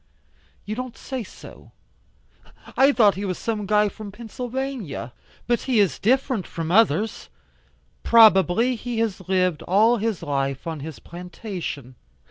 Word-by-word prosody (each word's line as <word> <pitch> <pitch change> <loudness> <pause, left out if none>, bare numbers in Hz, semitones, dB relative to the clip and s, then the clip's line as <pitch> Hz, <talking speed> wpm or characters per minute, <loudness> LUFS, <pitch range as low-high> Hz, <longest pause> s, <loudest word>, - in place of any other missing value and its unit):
"You 210 - -4
don't 255 +1 -6
say 260 -3 -5
so? - - -14 1.0
I 270 +2 +5
thought 215 -7 +4
he 195 - -5
was 185 -3 -2
some 215 -3 -3
guy 210 0 +3
from 205 0 -8
Pennsylvania. 235 - -5 0.3
But 240 -1 +1
he 240 -4 +3
is 190 -9 +2
different 255 -2 +1
from 165 0 -4
others. 215 0 +2 0.7
Probably 225 - +5
he 240 0 -5
has 200 -5 -2
lived 185 -4 +1
all 220 +6 +3
his 220 -3 -2
life 135 -1 -2
on 160 -2 -4
his 155 0 -7
plantation." 175 - -7
210 Hz, 135 wpm, -23 LUFS, 175-235 Hz, 1.0 s, I